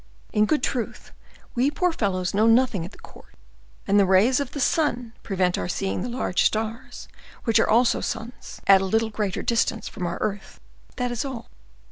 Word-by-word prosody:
In 210 -1 +3
good 305 - +1
truth, 240 -4 -3 0.4
we 250 +3 +2
poor 355 +4 0
fellows 185 - -1
know 215 +3 +3
nothing 230 -5 +3
at 175 - -8
the - - -16
court, - - -16 0.5
and 200 +1 +3
the 200 - +5
rays 205 +8 +4
of 280 -3 -3
the 285 - -4
sun 250 -6 0
prevent 185 -3 0
our - - -3
seeing 190 +2 -2
the 245 - -3
large 235 -7 -1
stars, 220 +3 -2 0.4
which 225 -2 +3
are - - +2
also 235 +2 +3
suns, 225 +2 -6
at 195 -1 +7
a - - -1
little 220 +3 0
greater 205 -2 -2
distance 225 -1 0
from 180 - -4
our 170 - -3
earth,—that 215 +4 -5
is 240 - -2
all." 260 -4 -7
225 Hz, 185 wpm, -24 LUFS, 195-245 Hz, 0.5 s, at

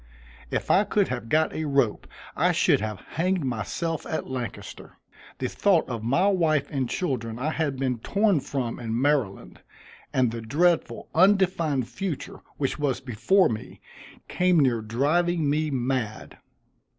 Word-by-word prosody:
If - - -1
I 195 - +5
could 205 -1 +1
have 120 -3 -4
got 155 +3 +2
a 160 - -3
rope 140 -6 +1 0.3
I - - +2
should - - +3
have 105 -2 -4
hanged 180 -1 -1
myself 145 +7 -3
at 160 - -3
Lancaster. 125 -3 -7 0.4
The 130 - -2
thought 190 +4 +2
of 120 -3 -4
my 135 - +2
wife 160 -8 +2
and 135 -4 -1
children 115 -9 -2
I 145 +5 -1
had 150 -4 -1
been 130 -3 -1
torn 200 - +2
from 130 -3 -4
in 115 -1 -2
Maryland, 125 - -1 0.5
and 125 -3 +2
the 115 0 -5
dreadful 165 +9 +1
undefined 175 - +3
future 190 - -5 0.2
which 140 +1 -2
was 140 -4 0
before 130 - +2
me, 110 -2 -6 0.5
came 180 -2 +2
near 125 -5 +2
driving 150 +9 +1
me 155 +2 +1
mad. 125 -4 -3
140 Hz, 150 wpm, -26 LUFS, 120-170 Hz, 0.5 s, I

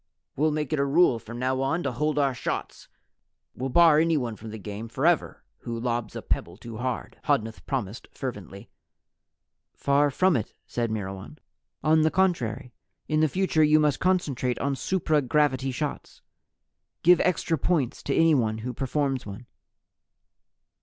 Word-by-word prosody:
"We'll 155 +3 +2
make 150 0 -2
it 155 - +1
a - - +3
rule 140 -3 +3
from 115 +2 -9
now 130 +1 0
on 145 +6 0
to - - -1
hold 150 +4 -1
our 140 -2 +2
shots. 125 - -5 0.7
We'll 130 +2 -4
bar 160 +1 +6
anyone 150 -9 +1
from 110 +1 -10
the 110 - -7
game 105 +2 -7
forever 155 +8 +1 0.2
who 115 -1 -5
lobs 120 -1 -2
a - - -6
pebble 85 +2 -2
too 115 0 -9
hard," 125 +1 -4
Hodnuth 110 0 0
promised 120 -5 -3
fervently. 100 -7 -7 1.0
"Far 145 +1 +2
from 185 +6 +2
it," 115 - -3
said 120 -1 -2
Myrwan. 100 +4 -5 0.5
"On 155 +1 +4
the 155 - +4
contrary, 135 -10 0 0.3
in 155 0 +1
the 155 0 +3
future 185 -2 +2
you 155 0 +5
must 150 -3 +2
concentrate 145 -9 0
on 140 0 -1
supra 155 -1 +1
gravity 135 0 +1
shots. 145 +3 -5 0.8
Give 180 +1 +6
extra 175 -2 +1
points 150 -8 0
to 140 - -2
anyone 130 -10 +3
who 125 +3 -5
performs 135 -1 -1
one." 100 +5 -8
135 Hz, 155 wpm, -26 LUFS, 115-155 Hz, 1.0 s, bar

